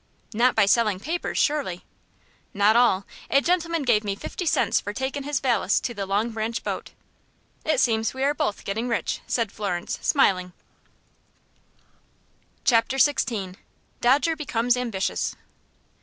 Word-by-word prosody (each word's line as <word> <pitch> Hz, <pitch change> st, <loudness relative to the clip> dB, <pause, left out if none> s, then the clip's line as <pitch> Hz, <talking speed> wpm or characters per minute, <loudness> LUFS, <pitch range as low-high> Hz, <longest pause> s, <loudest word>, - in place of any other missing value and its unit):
"Not 245 Hz, +3 st, +3 dB
by 220 Hz, -, +5 dB
selling 210 Hz, -2 st, +2 dB
papers, 330 Hz, -, -3 dB
surely?" 285 Hz, -, 0 dB, 0.7 s
"Not 205 Hz, +2 st, +4 dB
all. 220 Hz, -5 st, +3 dB, 0.2 s
A 275 Hz, -, +5 dB
gentleman 335 Hz, -1 st, 0 dB
gave 230 Hz, -5 st, +3 dB
me 200 Hz, -1 st, -2 dB
fifty 355 Hz, -, -5 dB
cents -, -, +2 dB
for 205 Hz, -, -5 dB
takin' 265 Hz, +3 st, -3 dB
his 290 Hz, -2 st, -1 dB
valise 235 Hz, -7 st, +2 dB
to 240 Hz, -, -3 dB
the 200 Hz, -3 st, -4 dB
Long 210 Hz, +4 st, 0 dB
Branch 225 Hz, +1 st, -3 dB
boat." -, -, -4 dB, 0.8 s
"It 310 Hz, -4 st, +2 dB
seems 225 Hz, -3 st, +2 dB
we 265 Hz, +1 st, -4 dB
are 285 Hz, +1 st, +3 dB
both 295 Hz, -9 st, -2 dB
getting 220 Hz, +5 st, -2 dB
rich," 230 Hz, -, -2 dB
said 230 Hz, -4 st, -1 dB
Florence, 185 Hz, -4 st, -3 dB
smiling. 185 Hz, -, +2 dB, 2.1 s
Chapter 240 Hz, +2 st, +2 dB
XVI. 220 Hz, -9 st, +1 dB, 0.4 s
Dodger 280 Hz, +7 st, +3 dB
Becomes 245 Hz, -5 st, 0 dB
Ambitious. 230 Hz, -6 st, -2 dB
235 Hz, 140 wpm, -24 LUFS, 205-275 Hz, 2.1 s, by